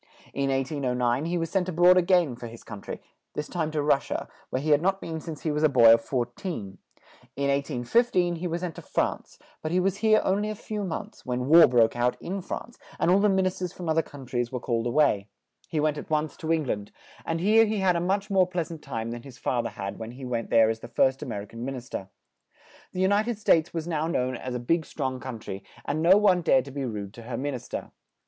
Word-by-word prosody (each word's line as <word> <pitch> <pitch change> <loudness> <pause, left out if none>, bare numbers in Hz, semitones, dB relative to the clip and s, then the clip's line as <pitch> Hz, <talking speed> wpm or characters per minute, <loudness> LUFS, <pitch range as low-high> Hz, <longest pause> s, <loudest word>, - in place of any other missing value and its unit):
In 140 0 0
1809 130 -1 0
he 175 +1 -1
was 165 -1 -2
sent 185 -2 0
a - - -1
broad 175 +2 +6
a 185 - +5
gain 175 -7 +3
for 120 0 -8
his 115 0 -11
coun 105 -3 -9
try; - - -6 0.4
this 150 - -3
time 165 -3 -2
to 155 -2 -1
Rus 140 -1 +2
sia, - - -3 0.2
where 130 - -1
he 155 +3 -1
had 145 0 +5
not 195 +2 +1
been 160 -3 -5
since 155 -3 -8
he 155 - 0
was 150 0 -1
a 155 - +5
boy 120 -4 +8
of 115 - +3
four 120 +1 -1
teen; 120 - -7 0.6
in 140 0 0
1815 170 - +1
he 180 +2 -3
was 170 0 -3
sent 180 -3 -3
to - - -9
France, - - -2 0.2
but 155 - -3
he 180 - +3
was 190 +1 +1
here 215 +1 +4
on 195 +2 +1
ly 210 - -1
a 215 - -3
few 210 0 -5
months, 200 +4 -6
when 125 -1 -2
war 165 +3 +9
broke 120 -3 +3
out 120 +1 0
in 195 +2 -4
France, 230 +5 -7 0.2
and 175 - +2
all 190 - +5
the 210 +1 +4
min 190 -1 +2
is 185 - -1
ters 180 -2 -3
from 175 -3 -5
oth 160 - +1
er - - +4
coun 140 -4 -11
tries 120 -1 -2
were 125 - -3
called 120 -1 -1
a - - 0
way; 120 -7 +2 0.4
he 155 - -1
went 150 0 +1
at - - -10
once 155 0 0
to 160 0 -3
Eng 160 -1 +2
land, 105 -6 -3 0.3
and 165 0 -2
here 215 +5 +5
he 215 0 -1
had 190 -2 +3
a - - +1
much 195 +3 -1
more 190 -2 +4
pleasant 170 -3 -4
time 115 -5 -4
than 120 0 -6
his 130 -1 -12
father 120 -1 -1
had 100 0 -6
when 115 +1 -6
he 130 +1 -8
went 120 -2 -3
there 115 -1 +5
as 110 - -5
the 120 - -9
first 130 +3 +2
Amer 115 -8 -4
i - - -9
can 115 +2 -9
min 135 +1 -3
is 125 -1 -9
ter; 95 - -5 0.8
the 185 - -3
U 190 - +4
nit 205 +3 +2
ed 240 -3 -1
States 170 -6 +3
was 165 -1 -4
now 160 -2 -1
known 130 -6 0
as 125 +1 -5
a - - -2
big 160 +8 +1
strong 130 -3 -3
coun 125 -2 -6
try, 95 -2 -7 0.2
and 150 +3 -1
no 180 +4 +7
one 195 -4 +4
dared 130 -5 +3
to 140 - -9
be 140 0 -3
rude 105 -4 -5
to 115 - -11
her 115 0 -5
min 145 +1 -2
is 125 - -7
ter. - - -6
150 Hz, 270 wpm, -27 LUFS, 125-180 Hz, 0.8 s, war